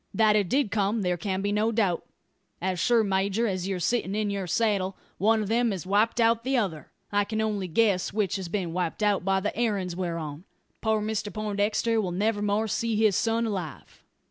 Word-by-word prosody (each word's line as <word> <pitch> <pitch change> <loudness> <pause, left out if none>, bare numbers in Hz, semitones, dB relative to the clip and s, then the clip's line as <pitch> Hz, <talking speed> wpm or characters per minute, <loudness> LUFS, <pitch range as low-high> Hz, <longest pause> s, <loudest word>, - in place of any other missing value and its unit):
That 215 -1 +4
it 200 -4 +2
did 265 -6 +1
come 210 +1 0
there 180 -1 +1
can 190 +2 -3
be 205 - 0
no 215 +2 +1
doubt. 205 -6 +1 0.6
As 185 0 -2
sure, 235 +4 +3
major, 195 +3 +1
as 185 -4 -2
you're 190 -2 -2
sittin' 205 0 0
in 210 -1 0
your 195 -2 -3
saddle, 200 -2 0 0.2
one 220 +2 +3
of - - -4
them 235 +2 +2
has 190 -4 -4
wiped 210 +5 +2
out 230 0 +3
the 265 +1 +1
other. 185 -10 -2 0.2
I 205 0 +3
can 220 +1 -3
only 210 -3 -1
guess 190 +1 +2
which 205 -1 0
has 185 -3 -6
been 180 -3 -2
wiped 180 +3 -2
out, 205 -3 +2
by 195 0 +2
the 210 - -2
errand 205 -6 -1
we're 175 -2 -2
on. 155 +1 -6 0.4
Poor 220 -1 +1
Mr 215 -1 -2
Poindexter 215 +2 0
will 190 - -2
niver 205 +4 0
more 210 +2 +1
see 230 +1 -1
his 215 -2 +3
son 230 +1 +1
alive." 185 -9 -5
205 Hz, 210 wpm, -27 LUFS, 190-220 Hz, 0.6 s, That